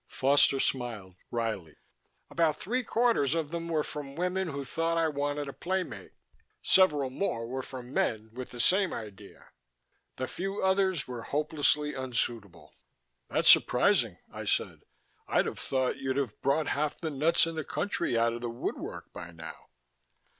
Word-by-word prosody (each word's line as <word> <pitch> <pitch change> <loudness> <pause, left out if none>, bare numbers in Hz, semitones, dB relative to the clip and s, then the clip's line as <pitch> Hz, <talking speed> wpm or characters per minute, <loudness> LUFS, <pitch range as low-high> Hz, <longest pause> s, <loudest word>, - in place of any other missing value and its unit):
Foster 135 0 +3
smiled 115 -9 -2 0.2
wryly. 110 -9 -3 0.6
"About 160 -3 +2
three 250 +9 -1
quarters 225 - +2
of 160 -2 -2
them 170 0 -3
were 160 -2 +1
from 140 -2 -7
women 180 +2 -1
who 140 -3 -4
thought 165 +4 -1
I 165 -1 +3
wanted 145 -1 -2
a 140 - -6
playmate. 185 +1 -3 0.5
Several 150 -8 +5
more 115 -7 -2
were 130 +3 -3
from 130 -1 -9
men 110 0 0
with 125 +1 -6
the 120 - -10
same 190 +8 +3
idea. 105 -2 -9 0.7
The 130 - -2
few 195 +2 -4
others 190 -4 +2
were 125 -2 -5
hopelessly 150 +1 +1
unsuitable." 120 -6 -3 0.6
"That's - - +7
surprising," 125 - +4 0.2
I - - -6
said. - - 0 0.5
"I'd - - +2
have - - -4
thought 130 -1 0
you'd 135 0 -2
have 130 -7 -2
brought 140 +3 +1
half 150 +1 -1
the 160 -2 -3
nuts 155 +5 +3
in 165 - -4
the 160 -1 -3
country 160 - -1
out 115 0 +2
of 120 - -6
the 120 - -3
woodwork 115 +1 -5
by 85 - -8
now." 80 -1 -9
140 Hz, 160 wpm, -29 LUFS, 120-165 Hz, 0.7 s, That's